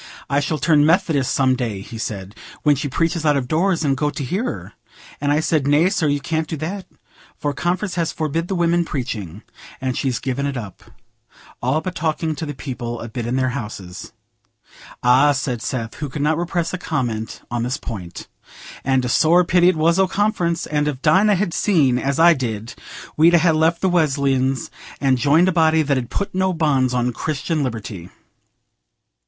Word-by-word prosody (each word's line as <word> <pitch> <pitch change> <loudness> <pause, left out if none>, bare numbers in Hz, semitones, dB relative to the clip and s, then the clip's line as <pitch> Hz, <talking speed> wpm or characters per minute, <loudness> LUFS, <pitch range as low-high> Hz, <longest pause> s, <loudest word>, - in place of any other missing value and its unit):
'I 140 - +3
shall 145 +2 -1
turn 150 -1 +3
Methodist 160 -4 +2
some 130 -1 +2
day,' 115 -6 -3
he 115 +3 -9
said, 100 -3 -5 0.3
'when 150 -1 +4
she 140 +2 -3
preaches 165 +3 0
out 150 -2 +3
of 130 -2 -2
doors, 170 +3 +1
and 135 -1 +2
go 145 +2 0
to 145 - -5
hear 185 - -2
her.' 245 - -5 0.5
And 145 0 +1
I 150 - +3
said, 155 -3 +1
'Nay, 150 +5 +4
sir, 180 -6 0
you 145 0 +1
can't 160 +2 -2
do 160 - -4
that, 180 +5 -5 0.5
for 145 -1 -2
Conference 180 +6 -1
has 170 -2 -1
forbid 160 +2 -2
the 190 - -2
women 170 0 +2
preaching, 110 - -5 0.4
and 130 -2 -2
she's 130 -3 -1
given 135 +2 -2
it 140 -2 -3
up, 105 -5 -8 0.8
all 130 +6 +1
but 185 - -4
talking 160 0 -1
to 160 +1 -5
the 145 - -5
people 120 -3 -5
a 115 - -6
bit 120 0 -4
in 120 - -1
their 130 -1 +1
houses.'" 105 -8 -7 0.9
"Ah," 130 +4 +5
said 130 -3 -2
Seth, 115 -3 -3
who 145 -1 -4
could 140 +2 -4
not 155 +2 +2
repress 175 -1 -2
a 185 - -3
comment 115 - -3
on 120 -1 -1
this 125 +2 -1
point, 90 -7 -7 0.6
"and 130 -1 +1
a - - -1
sore 165 +8 +4
pity 180 0 +4
it 185 - +1
was 165 +3 +2
o' 190 - +4
Conference; 185 -4 0
and 150 -1 0
if 140 -3 -4
Dinah 205 +2 +4
had 185 -2 -1
seen 145 - +2
as 140 +2 -1
I 170 +1 +7
did, 115 -5 -4 0.4
we'd 165 +3 +5
ha' 170 0 +4
left 160 +2 +2
the 190 - +2
Wesleyans 135 -5 +1 0.3
and 135 -2 +2
joined 150 +8 +4
a - - +3
body 160 -2 +3
that 140 -1 +1
'ud 120 -1 -6
put 200 - -3
no 190 0 +1
bonds 140 -6 +1
on 125 0 0
Christian 155 +3 -2
liberty." 110 -8 -5
145 Hz, 195 wpm, -20 LUFS, 130-165 Hz, 0.9 s, I